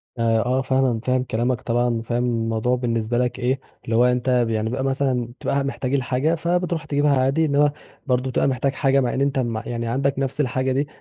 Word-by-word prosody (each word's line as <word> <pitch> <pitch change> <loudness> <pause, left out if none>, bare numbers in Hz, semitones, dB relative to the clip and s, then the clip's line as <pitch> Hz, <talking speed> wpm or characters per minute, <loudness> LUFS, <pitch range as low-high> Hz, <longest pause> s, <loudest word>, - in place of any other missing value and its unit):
آآ 115 -1 +2
آه 130 +2 +1
فعلًا، 130 -3 +1
فاهم 130 0 +1
كلامك 120 0 -1
طبعًا 120 +1 +1
وفاهم 120 +1 -1
الموضوع 115 0 0
بالنسبة 120 -2 -1
لك 125 +1 -1
إيه، 130 +2 0 0.3
اللي 115 - -1
هو 120 +2 +5
أنت 125 0 +1 0.2
يعني 110 0 -1
يبقى 130 +3 -2
مثلًا 130 -3 -1
تبقى - - -2
قاعد 140 0 +1
محتاج 135 -1 -3
الحاجة 135 +4 +1
فبترُوح 170 0 -1
تجيبها 145 -1 +2
عادي، 135 +5 +2
إنّما 145 0 +3 0.4
برضه 125 0 +1
بتبقى 130 - +1
محتاج 135 +1 0
حاجة 135 0 +2
مع 125 - 0
أنت 140 +1 0
م 120 -3 -1
يعني 115 -1 -3
عندك 135 +3 0
نفس 135 +2 -1
الحاجة 130 -1 0
دي، 140 +3 0
130 Hz, 200 wpm, -22 LUFS, 120-135 Hz, 0.4 s, هو